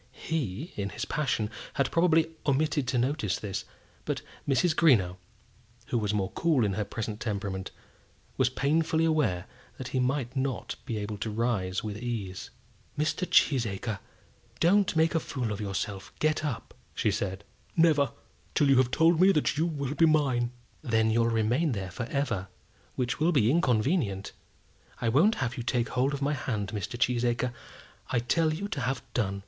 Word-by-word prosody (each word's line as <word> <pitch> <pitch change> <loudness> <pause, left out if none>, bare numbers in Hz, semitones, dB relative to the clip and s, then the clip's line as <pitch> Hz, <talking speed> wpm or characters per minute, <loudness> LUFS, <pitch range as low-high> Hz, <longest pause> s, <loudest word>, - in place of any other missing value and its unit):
He, 150 - -2
in 100 -1 -2
his - - -4
passion, 125 -7 -1 0.2
had 140 - +1
probably 165 -1 +3 0.2
omitted 145 -1 +1
to 125 - 0
notice 120 - 0
this; 100 -2 -4 0.4
but - - -3 0.3
Mrs. 155 +5 +3
Greenow, 100 - +4 0.7
who 120 - +1
was 105 -2 0
more 100 -2 -1
cool 155 -9 +2
in 100 - 0
her 105 - -1
present 105 +1 -5
temperament, 100 -4 -3 0.7
was 130 -2 +3
painfully 160 +5 +1
aware 125 - +1 0.3
that 130 - -6
he 130 - -1
might 130 -1 0
not 130 -2 -2
be 115 -4 -2
able 105 0 -4
to 110 - -2
rise 105 -5 -1
with 105 -1 -4
ease. 110 -6 -4 0.5
"Mr. 155 +5 0
Cheesacre, 115 -5 +2 0.6
don't 190 +2 +3
make 160 +1 +3
a 165 - +3
fool 125 -7 -3
of 105 +1 -4
yourself. 100 0 -4
Get 155 0 +1
up," 140 -7 -4 0.2
said 105 -5 +1 0.3
she. 105 - -13
"Never, 150 -6 +4 0.4
till 145 -2 +4
you 135 - +6
have 130 -1 +4
told 165 +5 +4
me 190 +1 +7
that 150 - +1
you 160 +3 +1
will 140 -4 -3
be 165 +2 +4
mine!" 135 -6 +2 0.3
"Then 110 -5 +2
you'll 115 +1 +3
remain 120 +7 +1
there 95 -3 -4
for 120 +2 -4
ever, 125 - -1 0.5
which 125 0 -1
will 160 +3 +3
be 125 -7 +4
inconvenient. 125 - +1 0.7
I 115 - +1
won't 170 - +4
have 120 +2 -4
you - - -2
take 120 0 0
hold 130 +2 +1
of 140 - -4
my 145 +2 +1
hand, 110 -7 -2
Mr. 105 +3 -4
Cheesacre. 120 0 +1 0.6
I - - +1
tell 155 +7 +2
you 180 +6 -3
to 140 - -3
have 125 +1 -1
done." 100 -5 0
125 Hz, 170 wpm, -28 LUFS, 110-150 Hz, 0.7 s, me